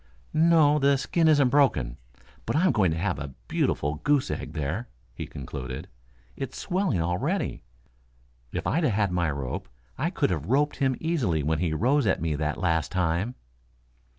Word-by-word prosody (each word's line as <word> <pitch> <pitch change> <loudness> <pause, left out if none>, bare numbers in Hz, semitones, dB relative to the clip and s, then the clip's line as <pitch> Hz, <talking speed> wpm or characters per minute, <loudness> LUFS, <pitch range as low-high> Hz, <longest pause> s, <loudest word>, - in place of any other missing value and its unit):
"No; 155 -2 +5
the 140 0 +4
skin 160 +4 +1
isn't 145 -4 +5
broken, 120 - +2 0.5
but - - 0
I'm 180 +4 +4
going 95 -5 +3
to 80 - -1
have 85 -4 -1
a 70 -2 -7
beautiful 75 +4 0
goose 145 -2 +2
egg 75 - -5
there," 80 - -3 0.2
he - - -6
concluded. 65 -1 -6 0.5
"It's 135 -1 -5
swelling 185 - 0
already. 90 +1 -1 0.9
If - - -4
I'd 165 +3 +1
had 105 -8 +2
my 85 -2 +1
rope 70 -3 -4 0.3
I - - +1
could - - 0
have 80 -2 -2
roped 145 +5 +2
him 135 -2 +1
easily 120 - 0
when 80 +2 0
he 85 -1 0
rose 125 - +2
at 95 - +2
me 80 -2 -1
that 75 0 -1
last 80 -3 0
time." 90 +6 0
95 Hz, 165 wpm, -26 LUFS, -, 0.9 s, No